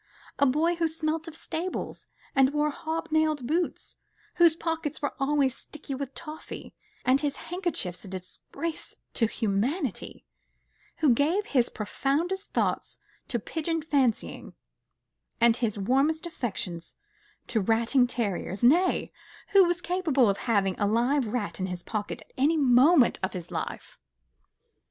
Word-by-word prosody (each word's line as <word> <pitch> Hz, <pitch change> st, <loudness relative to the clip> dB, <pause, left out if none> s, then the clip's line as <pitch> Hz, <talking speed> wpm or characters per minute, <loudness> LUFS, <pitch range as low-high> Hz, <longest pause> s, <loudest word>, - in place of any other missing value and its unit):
a 280 Hz, -, +5 dB
boy 310 Hz, +6 st, +2 dB
who 335 Hz, -1 st, +2 dB
smelt 320 Hz, 0 st, -2 dB
of 325 Hz, -, -8 dB
stables 340 Hz, +3 st, -4 dB, 0.3 s
and 270 Hz, +1 st, +4 dB
wore 300 Hz, 0 st, +2 dB
hob 320 Hz, +2 st, -4 dB
nailed 310 Hz, -4 st, +2 dB
boots, 330 Hz, +6 st, -2 dB, 0.4 s
whose 340 Hz, -2 st, +6 dB
pockets 325 Hz, -2 st, -3 dB
were 285 Hz, -, -2 dB
always 275 Hz, -2 st, +2 dB
sticky 300 Hz, -2 st, -8 dB
with 270 Hz, 0 st, -5 dB
toffee, 315 Hz, -1 st, -8 dB, 0.3 s
and 260 Hz, +2 st, +4 dB
his 290 Hz, -2 st, -1 dB
handkerchiefs 345 Hz, -, -3 dB
a -, -, -9 dB
disgrace 190 Hz, -, -5 dB, 0.2 s
to 225 Hz, -, +2 dB
humanity, 230 Hz, -, -2 dB, 0.8 s
who 265 Hz, -, +7 dB
gave 325 Hz, -, +1 dB
his 255 Hz, -, +2 dB
profoundest 315 Hz, -, -2 dB
thoughts -, -, -1 dB, 0.3 s
to 240 Hz, -, -1 dB
pigeon 325 Hz, +8 st, -2 dB
fancying, 275 Hz, -7 st, 0 dB, 0.8 s
and 235 Hz, 0 st, +5 dB
his 220 Hz, -4 st, -1 dB
warmest 275 Hz, -, +1 dB
affections 195 Hz, -, -4 dB, 0.5 s
to 225 Hz, -, 0 dB
ratting 230 Hz, +5 st, +3 dB
terriers, 205 Hz, -4 st, -2 dB
nay, 340 Hz, +10 st, +4 dB, 0.4 s
who 395 Hz, -2 st, +7 dB
was 350 Hz, 0 st, 0 dB
capable 330 Hz, -8 st, +2 dB
of 195 Hz, -, -4 dB
having 195 Hz, -4 st, +3 dB
a 205 Hz, -, +2 dB
live 240 Hz, +4 st, +2 dB
rat 215 Hz, -3 st, -3 dB
in 185 Hz, -, -1 dB
his 180 Hz, -1 st, -5 dB
pocket 210 Hz, -2 st, -4 dB
at -, -, -31 dB
any 305 Hz, +5 st, +3 dB
moment 270 Hz, +1 st, +5 dB
of 190 Hz, 0 st, -2 dB
his 175 Hz, -2 st, -7 dB
life. -, -, -5 dB
280 Hz, 140 wpm, -27 LUFS, 230-320 Hz, 0.8 s, who